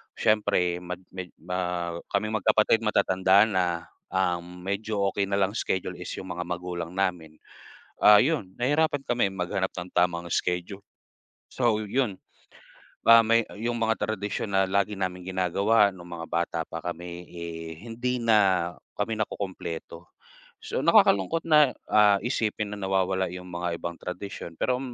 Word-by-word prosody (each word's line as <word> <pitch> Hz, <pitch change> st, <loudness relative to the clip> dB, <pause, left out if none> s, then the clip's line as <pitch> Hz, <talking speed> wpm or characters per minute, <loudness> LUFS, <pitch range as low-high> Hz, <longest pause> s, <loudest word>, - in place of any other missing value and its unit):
siyempre 90 Hz, -5 st, +2 dB
mag 90 Hz, 0 st, -5 dB, 0.2 s
may 90 Hz, -2 st, -6 dB
ma 90 Hz, -1 st, -3 dB, 0.2 s
kaming 110 Hz, +2 st, 0 dB
magkapatid, 110 Hz, +2 st, +3 dB
matatanda 100 Hz, -2 st, +4 dB
na, 95 Hz, -4 st, +1 dB, 0.5 s
um, 90 Hz, -1 st, -1 dB
medyo 100 Hz, +2 st, -2 dB
okey 100 Hz, -, 0 dB
na 100 Hz, -, +2 dB
lang 100 Hz, +2 st, +1 dB
schedule 95 Hz, -4 st, -2 dB
is 90 Hz, -, -6 dB
yung 95 Hz, -, -7 dB
mga 90 Hz, 0 st, -3 dB
magulang 90 Hz, -1 st, -4 dB
namin. 90 Hz, -5 st, -1 dB, 0.7 s
Ah, 105 Hz, 0 st, +9 dB
yun 130 Hz, -, -1 dB
nahirapan 145 Hz, +3 st, +1 dB
kami 120 Hz, -5 st, +1 dB
maghanap 95 Hz, +1 st, -1 dB
ng 90 Hz, 0 st, -6 dB
tamang 90 Hz, -1 st, +2 dB
schedule, 90 Hz, +3 st, -2 dB, 0.7 s
so 120 Hz, -4 st, +2 dB
yun, 105 Hz, -2 st, -1 dB, 0.9 s
ah, 115 Hz, 0 st, +9 dB
may 115 Hz, +1 st, +4 dB, 0.2 s
yung 120 Hz, +2 st, -1 dB
mga 110 Hz, -1 st, +1 dB
tradisyon 105 Hz, 0 st, -3 dB
na 95 Hz, 0 st, +4 dB
lagi 100 Hz, +2 st, +1 dB
naming 90 Hz, -1 st, -4 dB
ginagawa 100 Hz, +4 st, +3 dB
nung 90 Hz, -2 st, -12 dB
mga 85 Hz, -1 st, -6 dB
bata 85 Hz, 0 st, -1 dB
pa 85 Hz, -, -5 dB
kami, 85 Hz, +1 st, -6 dB
eh, 85 Hz, -1 st, -7 dB
hindi 120 Hz, +2 st, -2 dB
na 100 Hz, -6 st, +3 dB, 0.3 s
kami 110 Hz, +2 st, -1 dB
nakukumpleto. 85 Hz, -5 st, -5 dB, 0.5 s
So, -, -, -3 dB
nakakalungkot 100 Hz, -, +4 dB
na, 150 Hz, -4 st, +6 dB, 0.2 s
ah, 105 Hz, -1 st, +6 dB
isipin 110 Hz, -3 st, -1 dB
na -, -, -9 dB
nawawala 95 Hz, 0 st, +1 dB
yung 90 Hz, 0 st, -8 dB
mga 90 Hz, 0 st, -3 dB
ibang 85 Hz, 0 st, -4 dB
tradisyon, 90 Hz, -2 st, -7 dB
pero 125 Hz, 0 st, +1 dB
95 Hz, 145 wpm, -26 LUFS, 90-110 Hz, 0.9 s, Ah